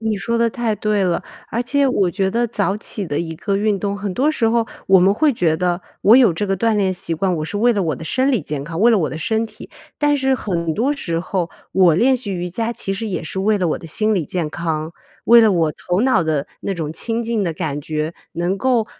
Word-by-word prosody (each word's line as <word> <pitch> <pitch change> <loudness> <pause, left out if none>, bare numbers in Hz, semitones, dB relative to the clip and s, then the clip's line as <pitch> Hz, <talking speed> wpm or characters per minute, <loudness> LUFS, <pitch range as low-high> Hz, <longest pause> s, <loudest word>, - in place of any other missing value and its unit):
你 220 -1 -1
说 235 +4 -2
得 230 0 +2
太 230 -2 -1
对 210 -2 0
了。 175 -2 0 0.3
而 235 +2 -1
且 275 +3 +1
我 195 -8 +1
觉 190 +2 0
得 240 +2 +1
早 205 -3 -1
起 210 -2 -4
的 145 -2 -2
一 165 -1 -5
个 195 +3 -1
运 210 -1 +1
动， 200 0 -2
很 200 -1 -4
多 285 +8 +2
时 230 -7 +1
候 230 0 +1 0.2
我 190 -1 +7
们 190 +3 +4
会 300 +5 +3
觉 165 -8 +1
得 180 +1 0 0.2
我 220 +4 +7
有 245 -8 +6
这 185 +6 -2
个 195 0 0
锻 225 +2 +1
炼 195 -2 +1
习 175 -2 -3
惯， 185 +3 0
我 155 - -3
是 205 +6 -4
为 240 +3 +4
了 205 -3 0
我 155 -4 -1
的 160 - -8
生 265 +10 +1
理 240 - +2
健 145 -2 -4
康、 165 +4 -5
为 235 - +6
了 220 - +4
我 155 - -1
的 - - -5
身 220 +7 0
体， - - -12 0.3
但 295 -1 +2
是 265 -1 +1
很 170 -9 -2
多 265 +6 +1
时 170 - -3
候 180 -1 -2 0.2
我 180 -4 +5
练 255 +9 +3
习 225 -5 -5
瑜 180 -1 -3
伽， 225 +5 -2
其 195 -4 -3
实 220 +3 -4
也 195 - -3
是 160 +4 -5
为 210 +2 +2
了 180 -3 0
我 - - -1
的 165 - -10
心 215 +7 +1
理 175 -6 0
健 165 -2 -3
康， 160 0 -3 0.3
为 235 0 +8
了 220 -2 +5
我 165 -4 +1
头 180 +4 -2
脑 255 -8 +3
的 150 -3 -1
那 195 - -3
种 160 -3 -4
清 230 +7 -2
静 225 -3 -1
的 170 - -1
感 155 -4 -3
觉。 155 +2 -3 0.2
能 175 +3 -1
够 240 -1 +1
195 Hz, 280 characters per minute, -19 LUFS, 170-230 Hz, 0.3 s, 为